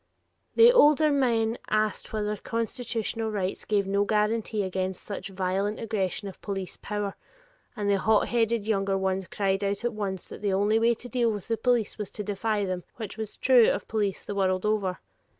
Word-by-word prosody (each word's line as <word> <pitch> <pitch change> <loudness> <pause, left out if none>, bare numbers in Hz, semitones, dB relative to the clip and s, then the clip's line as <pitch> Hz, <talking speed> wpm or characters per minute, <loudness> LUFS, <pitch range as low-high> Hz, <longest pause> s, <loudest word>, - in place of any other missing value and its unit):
The 465 +1 +8
older 305 - +5
men 235 -5 +1
asked 215 -1 0
whether 210 -1 -1
constitutional 230 0 -2
rights 195 -3 -3
gave 205 -2 +1
no 200 +1 +1
guarantee 215 0 0
against 185 0 -3
such 200 -1 -6
violent 195 +2 -1
aggression 205 -2 -2
of 190 - -10
police 195 -3 -4
power, 205 -1 -3 0.6
and 205 -1 -2
the 200 -1 +3
hot 220 +1 +3
headed 230 -2 +1
younger 195 -3 +1
ones 190 -1 -1
cried 195 0 0
out 200 +3 -1
at 240 - 0
once 195 -3 -4
that - - -10
the 200 -2 0
only 205 +3 +3
way 230 +1 +3
to 245 - -9
deal 240 -1 +1
with 205 -3 -6
the 230 - +1
police 230 -2 0
was 210 - -4
to 210 - -6
defy 205 +1 -1
them, 185 -2 -3
which 215 -3 -6
was 220 -1 -6
true 250 -3 +6
of - - -2
police 205 -4 -1
the - - -4
world 185 -1 +1
over. 200 -4 0
210 Hz, 185 wpm, -27 LUFS, 195-225 Hz, 0.6 s, The